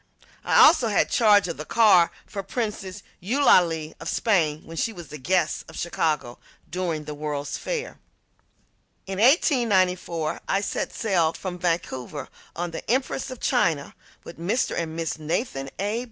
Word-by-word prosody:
I - - 0
also 305 -7 +7
had 210 - +1
charge 205 -4 +5
of 170 - -5
the 155 - -5
car 200 -4 +5 0.2
for 200 - -5
Princess 205 -3 -4 0.2
Eulalie 175 - +3
of 165 - -5
Spain, 160 -8 +1
when 165 - -10
she 225 - -1
was 175 -7 -11
the 150 - -8
guest 175 +3 0
of - - -11
Chicago 155 -7 -1 0.3
during 170 -3 -3
the 150 - -6
World's 145 -1 -4
Fair. - - -4 1.1
In 195 0 -5
1894 190 - +2
I 195 - +2
set 200 - -3
sail 175 -7 +1
from 180 -2 -6
Vancouver 155 -6 -3 0.3
on 175 0 -3
the 165 - -5
Empress 260 +2 0
of 255 -2 -8
China 150 -4 +1 0.3
with 170 - -11
Mr. 215 +10 0
and 165 -1 -3
Mrs. 165 -1 -3
Nathan 155 - -3
A. 205 +4 -1
180 Hz, 155 wpm, -25 LUFS, 160-215 Hz, 1.1 s, also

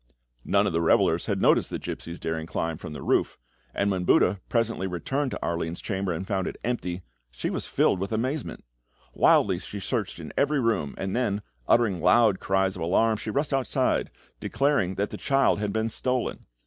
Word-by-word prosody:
None - - +2
of - - -1
the 85 - +1
revellers 85 - +3
had - - 0
noticed - - +3
the - - -3
gipsy's 85 +1 -6
daring 80 0 -3
climb 80 -1 -3
from 75 - -7
the - - -7
roof, - - +1 0.3
and 100 +8 0
when 95 -2 -1
Buda 90 +2 +3
presently 115 -5 0
returned 130 - -2
to - - -5
Arline's 85 0 -2
chamber 95 -2 -2
and 85 +3 -3
found 95 -2 -1
it - - -5
empty, 95 -7 -3 0.3
she - - -4
was - - -4
filled - - +2
with 95 +2 -3
amazement. 130 - -3 0.5
Wildly 95 -4 +4
she 100 +1 -7
searched 110 0 -3
in 80 - -8
every 145 0 +2
room, 115 - 0
and 95 +1 -3
then, 105 -5 0 0.2
uttering 105 -8 +3
loud 100 +3 +4
cries 95 0 +1
of 90 - -7
alarm, 110 +7 +2
she 110 - -6
rushed 140 +6 -1
outside, 135 -3 +1 0.3
declaring 135 -10 +1
that 100 +2 -2
the - - -5
child 135 -6 +2
had 105 -1 -1
been 110 +2 -1
stolen. 125 +1 -2
100 Hz, 190 wpm, -26 LUFS, 90-115 Hz, 0.5 s, Wildly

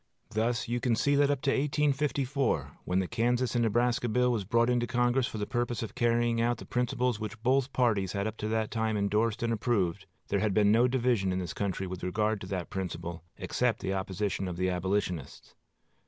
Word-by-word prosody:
Thus 115 +1 0
you 120 +1 -1 0.2
see 145 +5 +2
that 140 0 +4
up 145 -1 0
to 140 - +2
1854, 140 -2 0
when 90 - 0
the 95 -1 +1
Kansas 120 +2 0
and 120 - +2
Nebraska 120 +2 +1
bill 125 +2 +2
was 110 -4 0
brought 115 +4 +2
into 120 -1 +1
Congress 120 +1 +2
for - - -6
the 105 - -2
purpose 120 0 -2
of 110 - -6
carrying 120 0 +2
out 120 +1 +1
the - - -10
principles 125 -2 0
which 110 0 -5
both 135 +2 +2
parties 105 -7 +1
had 100 -1 -1
up 110 0 -3
to 105 - -3
that 110 0 -1
time 110 -1 0
indorsed 105 +3 +1
and 115 0 +1
approved, 105 -6 0 0.2
there - - +1
had 105 -3 0
been 105 -1 +5
no 120 +3 +5
division 120 -6 +1
in 90 - -1
this 90 -3 -3
country 95 -2 -2
in 90 - -5
regard 105 +3 0
to 95 - -7
that 95 -3 -4
principle, 85 -3 -4
except - - 0
the 95 - -2
opposition 95 0 -2
of 90 -1 -5
the 90 +1 +1
Abolitionists.... 90 -4 -2
115 Hz, 205 wpm, -29 LUFS, 100-120 Hz, 0.2 s, been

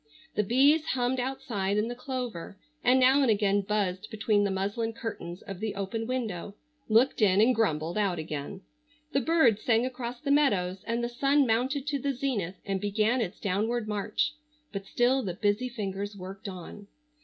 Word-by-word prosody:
The - - +2
bees 275 +9 +4
hummed 250 +1 0
outside 215 -6 -2
in 210 +2 +1
the 240 - -3
clover, 245 -7 -5 0.3
and 250 +1 +5
now 260 +2 +5
and 265 - +3
again 205 -1 +3
buzzed 200 -1 -1
between 215 -1 +1
the 200 - +1
muslin 205 +4 -1
curtains 185 -6 -6
of 195 -3 -7
the 215 0 -3
open 200 +3 -3
window, 215 -7 -3 0.3
looked 230 +4 +3
in 195 -2 +5
and 230 +4 +5
grumbled 170 -5 0
out 195 -4 +1
again. 155 +4 -5 0.5
The 275 - +2
birds 260 -8 +3
sang 230 0 +2
across 250 -1 -5
the 280 +1 -1
meadows 195 -11 +2
and 230 +1 -1
the - - +1
sun 275 +4 +2
mounted 260 +4 0
to 295 -1 -1
the 280 +1 -1
zenith 225 -9 -2
and 195 -1 -2
began 215 +4 +1
its 205 -3 -4
downward 215 +4 -1
march, 210 +6 -1 0.4
but 195 -1 -5
still 255 +2 +2
the 185 -7 -4
busy 210 +6 0
fingers 205 -3 -4
worked 195 +3 -7
on. 190 +2 -9
220 Hz, 180 wpm, -28 LUFS, 195-250 Hz, 0.5 s, and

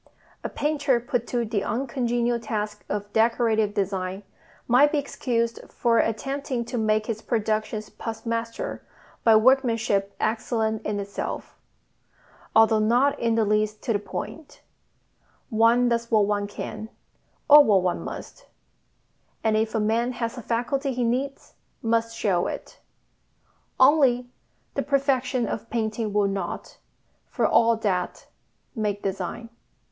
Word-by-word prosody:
A - - -3
painter 290 -4 +1
put 240 0 -2
to 240 -1 -1
the 210 -2 -1
uncongenial 240 -1 -1
task 210 -2 -4
of 205 0 -4
decorative 220 -2 +2
design 190 -1 -2 0.4
might 270 +5 +5
be 310 - +1
excused 235 -4 -1
for 230 -1 +2
attempting 265 +2 -1
to 245 - -4
make 215 0 +1
his 220 -1 -4
productions 215 -1 -2
pass 225 0 -7
muster 230 - -3 0.4
by 225 -1 +6
workmanship 225 -5 +2
excellent 220 -1 -1
in 210 -1 -1
itself, 200 0 -5 1.0
although 220 0 +6
not 250 +7 +2
in 230 -1 +1
the 225 -1 +2
least 215 0 0
to 235 - 0
the 205 - +1
point: 285 +8 -7 0.9
one 230 +2 +4
does 235 -1 0
what 215 -3 +4
one 205 0 -1
can, 215 +1 -7 0.6
or 295 0 +10
what 200 -7 +3
one 180 -1 0
must; - - -8 1.0
and 220 -1 +2
if 220 +1 0
a - - +2
man 230 +4 +1
has 235 0 -3
a 245 - -7
faculty 260 +5 -1
he 250 0 -1
needs 260 +4 -2 0.3
must 230 0 0
show 180 -4 +1
it. - - -7 1.0
Only, 260 -3 +4 0.4
the 275 - -1
perfection 265 -3 +1
of 225 - -5
painting 220 -1 -2
will 205 0 +2
not, 195 -3 -5 0.5
for - - -1
all 230 0 +4
that, 185 -5 -2 0.5
make 210 -3 -2
design. 195 +4 -4
230 Hz, 135 wpm, -25 LUFS, 215-245 Hz, 1.0 s, or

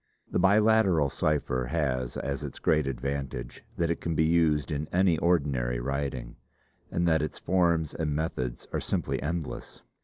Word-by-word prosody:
The - - +1
Biliteral 100 -6 +4
cipher 65 -5 0
has 65 -3 -1
as 70 -1 -3
its - - -6
great 75 -3 +2
advantage, 70 -1 -4
that 85 -1 +1
it 85 - -3
can 85 -1 -2
be 80 - +3
used 80 -4 +2
in 75 +1 -2
any 90 -3 +3
ordinary 70 -8 +1
writing, 65 -2 -3 0.5
and 85 +1 0
that 80 -2 +3
its 75 - -3
forms 85 -4 +1
and 75 -3 -2
methods 65 -6 -3
are - - 0
simply - - -1
endless. 80 +1 -4
75 Hz, 155 wpm, -28 LUFS, 70-85 Hz, 0.5 s, Biliteral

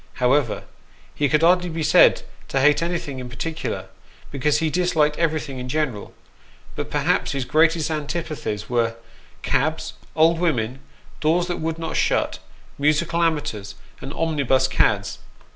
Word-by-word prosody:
However, 125 -2 +1 0.5
he 145 -1 0
could 155 +1 +2
hardly 180 +1 +4
be 160 -1 -3
said - - +5 0.2
to 135 - 0
hate 145 +3 +4
anything 165 -6 -3
in 125 -1 -7
particular, 155 +7 -4 0.5
because 145 +2 +1
he 160 0 0
disliked 160 -4 +1
everything 155 -5 -1
in 125 0 -6
general; 130 -8 -2 0.6
but - - -4
perhaps - - 0
his 135 -2 -2
greatest 160 +2 +2
antipathies 150 -9 -3
were 115 -2 0 0.5
cabs, - - 0 0.2
old 165 +1 +4
women, 130 -7 0 0.4
doors 170 +3 +2
that 175 -1 -3
would 160 0 -3
not 165 0 -3
shut, - - +1 0.4
musical 155 +4 +1
amateurs, 145 -11 -1 0.3
and 135 - -6
omnibus 145 -5 +1
cads. - - +1
150 Hz, 140 wpm, -22 LUFS, 130-165 Hz, 0.6 s, said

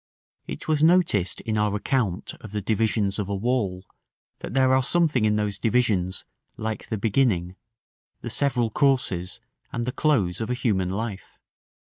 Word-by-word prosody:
It 65 - -6
was 155 -2 +2
noticed 160 - +3
in 110 -1 -1
our 105 -1 +1
account 105 -4 -1
of 105 -2 -10
the 105 - -1
divisions 105 -1 0
of 100 -1 -3
a 100 - -1
wall, 100 -4 -1 0.5
that - - -7
there 130 -1 +4
are 130 - +4
something 150 -4 +2
in 105 0 +3
those 105 -2 -1
divisions 105 -6 +1 0.3
like 110 0 -4
the 110 - -2
beginning, 100 -5 +1 0.7
the - - -5
several 120 -5 +1
courses, 115 - +1 0.3
and 120 - -2
the 125 - -1
close 115 - +1
of 110 - -3
a 125 - 0
human 100 -8 0
life. 100 0 -5
110 Hz, 160 wpm, -25 LUFS, 100-125 Hz, 0.7 s, there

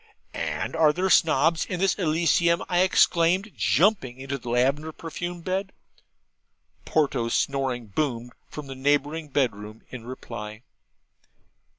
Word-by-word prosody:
'And - - -3
are 160 -2 +5
there 185 +4 -1
Snobs 160 0 +3
in 180 - -4
this 195 0 +3
Elysium?' 170 0 +2
I 175 -1 +1
exclaimed, 185 +2 +3
jumping 135 - +2
into 135 +1 -5
the 120 - -8
lavender 135 +6 +1
perfumed 175 +2 -6
bed. 190 +2 -2 1.1
Ponto's 135 -7 0
snoring 135 -3 -1
boomed 120 +2 -3 0.2
from 150 - -8
the 135 - -7
neighbouring 145 +4 0
bed 130 -4 +1
room 105 +2 -11
in 125 -3 -8
reply. 115 -3 -8
150 Hz, 125 wpm, -25 LUFS, 125-170 Hz, 1.1 s, are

